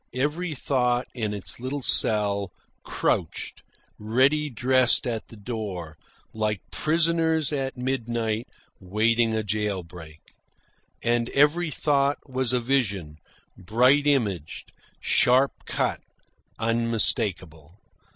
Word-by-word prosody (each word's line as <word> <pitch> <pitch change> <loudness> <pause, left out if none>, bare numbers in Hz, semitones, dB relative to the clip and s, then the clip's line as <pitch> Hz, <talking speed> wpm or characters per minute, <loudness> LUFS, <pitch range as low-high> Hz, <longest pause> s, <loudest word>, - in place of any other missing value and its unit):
Every 150 +5 -1
thought, 125 -2 0
in 110 -4 -3
its 105 +1 -4
little 130 +3 -4
cell, 100 -4 +4 0.3
crouched - - -2 0.4
ready 135 +8 +2
dressed 130 +1 +2
at 115 -3 -3
the 115 - -13
door, 100 -7 -6 0.4
like 105 -2 -1
prisoners 160 -1 +1
at 135 -2 -3
midnight 120 -2 -2 0.3
waiting 110 +4 +1
a 110 - -1
jail 105 -2 -2
break. 85 -2 -13 0.8
And 120 0 +1
every 155 +4 +3
thought 140 -1 +1
was 130 -2 -1
a 125 - +1
vision, 100 - -1 0.4
bright 125 +9 +3
imaged, 105 - -1 0.3
sharp 130 +2 +3 0.2
cut, - - -1 0.6
unmistakable. 105 - -1
120 Hz, 100 wpm, -25 LUFS, 105-135 Hz, 0.8 s, cell